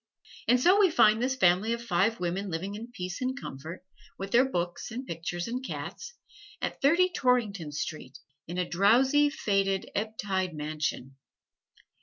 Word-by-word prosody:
And 250 +1 +5
so 365 +10 +5
we 395 -3 +6
find 225 -7 +4
this 260 +1 +1
family 200 0 +3
of 235 0 -5
five 200 +2 +1
women 180 +3 -2
living 185 +4 -3
in 225 +3 -7
peace 180 -4 -6
and 260 +2 -2
comfort, 160 - -8 0.3
with 195 +1 -6
their 255 +4 +4
books 175 -6 -3
and 245 +3 -6
pictures 175 +1 -4
and 250 +2 -4
cats, 470 - -6 0.4
at - - -4
Thirty 345 +6 +4
Torrington 215 - +1
Square, 145 -3 -5 0.3
in 175 +2 -5
a 180 -1 0
drowsy, 260 +10 +4
faded, 195 -8 0
ebb 220 +2 -3
tide 190 -4 -1
mansion. 150 -3 -4
200 Hz, 160 wpm, -28 LUFS, 175-250 Hz, 0.4 s, we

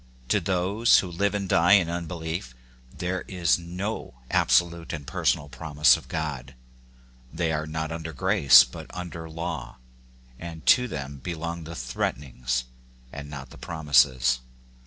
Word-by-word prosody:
To 105 - +3
those 95 +5 +3
who 90 - 0
live 100 +4 0
and 100 -2 -2
die 85 +1 +4
in 95 -4 +5
un 85 0 -3
belief 80 -6 -5 0.4
there 90 +5 -3
is 90 -3 +1
no 90 - -5 0.2
absolute 85 -1 +2
and 75 -3 -6
personal 70 - 0
promise 75 +2 +3
of - - -9
God: 70 -6 -4 0.8
they 80 0 -1
are 75 0 -2
not 80 0 -3
under 80 0 -5
grage 70 - +6
but - - -9
under 85 -2 -6
law, 80 -7 -5 0.6
and 80 -2 -8
to 125 -1 +5
them 70 - -6
belong 85 +3 -5
the 85 +1 -8
threatenings 60 0 -2 0.5
and 75 0 -7
not 70 -3 -8
the - - -13
prom 80 -3 -7
ises. 65 -3 +4
80 Hz, 150 wpm, -26 LUFS, 70-90 Hz, 0.8 s, grage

